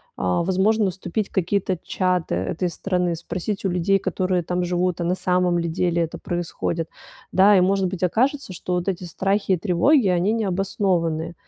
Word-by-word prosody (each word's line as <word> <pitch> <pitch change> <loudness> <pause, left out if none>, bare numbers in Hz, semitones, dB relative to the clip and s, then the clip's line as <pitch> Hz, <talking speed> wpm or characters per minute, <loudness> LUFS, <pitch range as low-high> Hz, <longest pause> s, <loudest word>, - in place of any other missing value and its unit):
а, 90 - 0
возможно 195 +3 +2
вступить 190 +3 -3
в - - -38
какие-то 190 0 0
чаты 180 - 0
этой 160 - -2
страны, 180 -1 -1
спросить 185 +5 -4
у - - +2
людей, 180 +2 +2
которые 185 -2 -1
там 180 +2 -1
живут, 180 0 0
а - - 0
на 175 +2 +1
самом 180 -1 +1
ли 170 0 -1
деле 170 0 0
это 165 - -5
происходит, 170 -1 -3 0.4
да? 195 +2 +6
И, - - +5
может 190 +1 +2
быть, 185 0 -5
окажется, 255 - 0
что 180 - -4
вот 180 0 -1
эти 185 -2 -2
страхи 195 +3 0
и - - +2
тревоги- 210 - +3
они 180 +3 +2
необоснованные, 185 -5 -1
180 Hz, 180 wpm, -23 LUFS, 175-195 Hz, 0.4 s, да